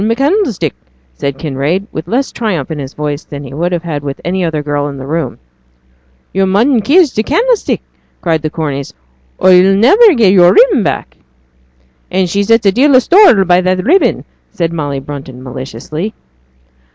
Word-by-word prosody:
'I'm 225 +2 +1
candlestick,' 275 - 0 0.4
said 140 - -4
Kinraid, 155 +6 -2
with 155 +1 -6
less 255 +8 -1
of - - -19
triumph 180 - -3
in 155 - -4
his 135 -1 -7
voice 150 0 -4
than 145 -1 -9
he 135 -1 -10
would 170 +5 -2
have 175 -1 -2
had 155 -4 -4
with 140 -1 -6
any 185 +2 -1
other 160 -3 -2
girl 145 0 -2
in 140 -1 -7
the 135 - -8
room. 160 +4 -3 1.0
'Yo' 195 0 +1
mun 230 +7 +2
kiss 300 - +3
t' 215 - 0
candlestick,' 445 - 0 0.4
cried 165 -3 -1
the 155 - -2
Corneys, 145 -4 -5 0.4
'or 185 - +4
yo'll 185 +2 +5
niver 370 - +5
get 210 -6 +4
yo'r 175 -2 +5
ribbon 440 - +4
back.' - - -3 0.9
'And 185 0 0
she 200 +4 -1
sets 225 +2 +2
a 195 - +5
deal 265 +6 +3
o' - - +8
store 260 - +5
by 180 0 +3
that 185 +1 -1
ribbon,' 360 +9 +2 0.2
said 170 -1 -3
Molly 145 -4 -3
Brunton, 135 -2 -9
maliciously. 135 - -6
180 Hz, 185 wpm, -13 LUFS, 145-230 Hz, 1.0 s, o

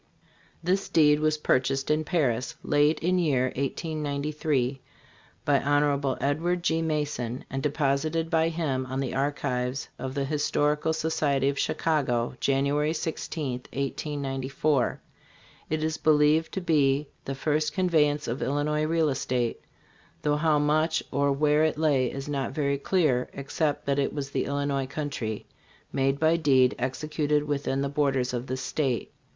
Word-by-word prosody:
This 190 +3 0
deed 150 -2 +5
was 155 0 +1
purchased 135 -1 +1
in 155 +1 +2
Paris, 150 -3 0
late 150 +1 +3
in 180 +2 +2
year 130 -6 +1
1893, 145 -2 -2 0.6
by 140 -1 +4
Hon. 145 -1 +1
Edward 170 +5 0
G. 165 0 +1
Mason 145 -6 -2
and 135 0 -2
deposited 150 +3 0
by 160 -1 +3
him 145 -6 -2
in 130 - -2
the 135 -2 -2
archives 135 -2 -1
of 130 0 -5
the 140 -1 0
Historical 150 +1 +1
Society 150 -4 +1
of 140 - -3
Chicago, 125 -8 0
January 140 +3 +1
16, 155 -3 -3 0.2
1894. 140 -1 -1 0.7
It 155 0 -1
is 160 0 -1
believed 155 +1 +3
to 190 - -2
be 145 -4 +2 0.2
the 135 - -3
first 150 +2 0
conveyance 155 -5 +2
of 120 +3 -3
Illinois 150 +2 0
real 160 -1 +2
estate, 125 -3 -1 0.6
though 150 0 +2
how 155 0 +3
much 155 +2 +2
or 140 +1 +2
where 150 +2 +3
it 155 -1 +1
lay 140 -5 +2
is 135 +1 -6
not 140 -3 -2
very 140 -1 0
clear, 145 -7 +1
ex 140 -1 -8
cept 150 -3 0
that 140 0 +1
it 140 - 0
was 135 -2 -4
the - - -1
Illinois 140 -1 -1
country, 135 -7 -4 0.5
made 135 +1 +1
by 160 +1 +3
deed 130 -5 +4
executed 150 +3 0
within 145 -2 -1
the - - 0
borders 135 -3 0
of 120 +1 -3
this 130 0 -3
state. 130 -4 -1
145 Hz, 145 wpm, -27 LUFS, 135-155 Hz, 0.7 s, deed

